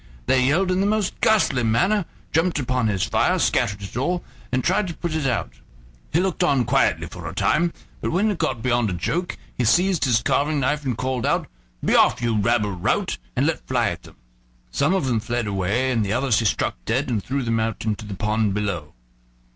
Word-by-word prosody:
They 130 -1 +3
yelled 180 +6 +2
in 185 +1 +1
the 200 - +2
most 210 -2 -1
ghastly 170 -12 +3
manner, 175 - +2 0.3
jumped 165 +2 +2
upon 125 -3 0
his 100 -3 0
fire, - - +2
scattered 100 0 +1
it 100 - -8
all, 175 +8 -1 0.3
and 130 0 0
tried 190 +2 +1
to 170 - -5
put 170 -2 -4
it 155 -3 0
out. 120 - -1 0.6
He 165 - +2
looked 185 0 0
on 140 -8 +2
quietly - - +2
for - - -7
a - - -9
time, 170 +2 +2 0.3
but - - -1
when 200 +6 +2
it 195 - -4
got 130 -8 -1
beyond 120 -3 +2
a - - -2
joke 170 - -2 0.2
he 125 - -1
seized 180 - +3
his 120 -2 +2
carving 145 +2 +1
knife 145 +3 0
and 125 -4 -1
called 130 -2 -2
out: - - +1 0.4
"Be - - +2
off, - - +4
you 120 -2 0
rabble 105 0 +1
rout!" 90 -8 -1 0.2
and - - +2
let - - -2
fly - - +1
at - - -6
them. - - -16 0.6
Some 155 +7 +2
of 185 - 0
them 120 -4 +1
fled 120 +1 -2
away, 100 +6 0
and 115 -3 +1
the 100 0 -1
others 125 -2 +2
he 115 - -1
struck 105 - 0
dead 130 +5 0
and 110 -6 -1
threw 135 +1 -2
them 115 -1 0
out 110 0 -2
into 110 0 -2
the 105 -2 -6
pond 105 0 0
below. 90 -9 -3
125 Hz, 220 wpm, -23 LUFS, 110-160 Hz, 0.6 s, off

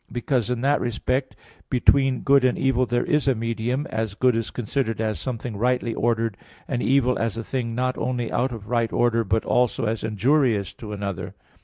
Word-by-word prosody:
Because 120 0 -1
in 125 -1 -1
that 140 +2 +2
respect, 125 +3 -1 0.3
between 130 0 +3
good 140 -1 +4
and 130 - +2
evil 130 -1 +2
there 120 0 0
is 150 -5 +1
a 135 - +4
medium, 115 +4 -2
as 110 -2 -2
good 125 +1 +3
is 115 -1 -1
considered 120 -1 -2
as 110 -2 -1
something 120 -3 -4
rightly 125 +1 0
ordered, 115 -3 0 0.3
and 125 -3 -2
evil 125 -1 +2
as 115 -1 -1
a 115 - -3
thing 115 -2 -3
not 130 +1 -1
only 125 -2 -2
out 130 +2 0
of 110 -4 -8
right 115 -2 0
order, 115 -1 +2
but 110 +2 0
also 125 0 +1
as 110 0 -2
injurious 110 -1 +1
to 105 -2 -9
another. 100 -3 -5
120 Hz, 190 wpm, -24 LUFS, 115-130 Hz, 0.3 s, good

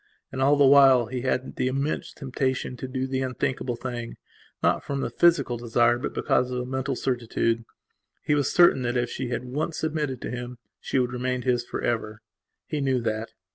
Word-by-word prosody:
And 130 - -4
all 140 +2 +5
the 145 -1 +5
while 135 -3 +7
he 125 +2 -4
had 130 0 -2
the - - +1
immense 140 +3 -2
temptation 130 -1 -2
to 130 - -5
do 130 0 -2
the 130 0 -2
unthinkable 130 -1 -2
thing, 120 -1 -6 0.5
not - - +2
from 140 -1 -3
the - - -2
physical 145 -8 +3
desire 120 +1 +2
but - - -4
because 125 - +1
of 125 0 -2
a 125 - -3
mental 130 +1 -2
certitude. 115 -2 -1 0.6
He - - +1
was 145 -1 +1
certain 175 -6 +5
that 120 0 -1
if 120 -1 -1
she 130 - -3
had 125 +1 -3
once 150 +6 -3
submitted 150 -5 -2
to - - -4
him 125 0 -6 0.2
she - - -2
would 125 -1 +1
remain 125 0 -2
his 125 -2 +1
for - - -5
ever. 110 -2 -2 0.4
He 150 -2 -3
knew 135 -2 +1
that. 110 0 -3
130 Hz, 200 wpm, -26 LUFS, 120-135 Hz, 0.6 s, while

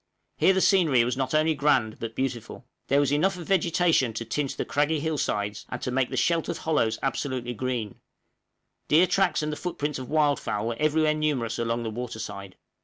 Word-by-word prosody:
Here 190 - +4
the 190 - +1
scenery 160 - +4
was 125 +2 -1
not 130 +2 -1
only 155 +1 +3
grand, 135 -8 +1
but 115 -1 -6
beautiful; 130 -4 -4 0.2
there 140 - +3
was 145 -1 +2
enough 180 +6 +2
of 175 - -8
vegetation 170 -8 +2
to 115 +1 -5
tint 140 +4 -2
the - - -2
craggy 150 +2 +1
hill 155 0 -2
sides 105 -2 -2
and - - -4
to 125 - -2
make 130 0 +1
the - - -4
sheltered 165 0 +1
hollows 150 -9 0
absolutely 130 -3 -2
green; 120 -3 -3 0.9
deer 160 +4 +5
tracks 185 -5 +1
and 150 - -2
the - - -3
foot 180 +3 -5
prints 145 -1 -2
of 130 - -7
wildfowl 145 -8 +1
were 120 - -3
everywhere 155 0 +2
numerous 145 -7 -1
along 115 0 -1
the 110 - -3
water 120 0 -5
side. 100 -3 -7
140 Hz, 200 wpm, -26 LUFS, 120-155 Hz, 0.9 s, deer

